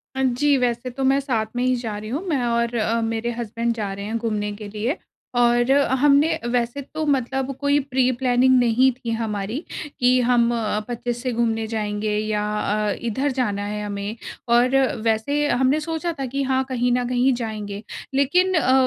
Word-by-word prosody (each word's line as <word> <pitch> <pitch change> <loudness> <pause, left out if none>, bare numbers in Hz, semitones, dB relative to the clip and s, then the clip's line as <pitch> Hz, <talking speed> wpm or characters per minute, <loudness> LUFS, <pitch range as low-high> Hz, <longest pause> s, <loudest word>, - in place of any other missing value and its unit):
अ, 265 - -1
जी, 275 +3 +3
वैसे 245 0 -1
तो 265 +2 -4
मैं 270 +1 +4
साथ 240 -6 -1
में 245 - 0
ही 255 0 +2
जा 225 -4 -4
रही 215 +1 -7
हूँ। 295 +9 -3
मैं 285 -6 0
और 235 0 0
अ, 230 +1 +1
मेरे 225 +1 -1
हज़्बन्ड 235 0 -2
जा 205 -3 -3
रहे 200 +1 -6
हैं 225 +2 -2
घूमने 210 -2 -2
के 210 -1 -8
लिए 225 - -2 0.4
और 240 +1 +3
अ, 280 -1 +3
हमने 285 +3 +4 0.2
वैसे 240 +4 -1
तो 310 +3 -5
मतलब 270 -1 0
कोई 285 0 +2
प्री-प्लानिंग 255 0 +3
नहीं 245 +2 +4
थी 240 -2 -6
हमारी 215 - -3 0.4
कि 250 0 +4
हम 240 -1 +4
अ, 215 -2 -1
25 240 0 -3
से 255 - -1
घूमने 225 -1 0
जाएँगे 210 -1 -2
या 210 -1 -1 0.2
अ, 210 0 0
इधर 260 +5 -1
जाना 205 -4 0
है 210 0 -4
हमें। 205 +2 -4 0.3
और 245 +3 +4 0.3
वैसे 285 +7 +1
हमने 265 +4 +2
सोचा 330 +2 -3
था 270 - -1
कि 275 +2 -2
हाँ, 265 0 +1
कहीं 245 -1 +1
न 245 0 +1
कहीं 250 +1 +3
जाएँगे। 215 -3 -5 0.3
लेकिन 360 +8 +3
अ, 260 -5 +3
240 Hz, 190 wpm, -22 LUFS, 220-265 Hz, 0.4 s, मैं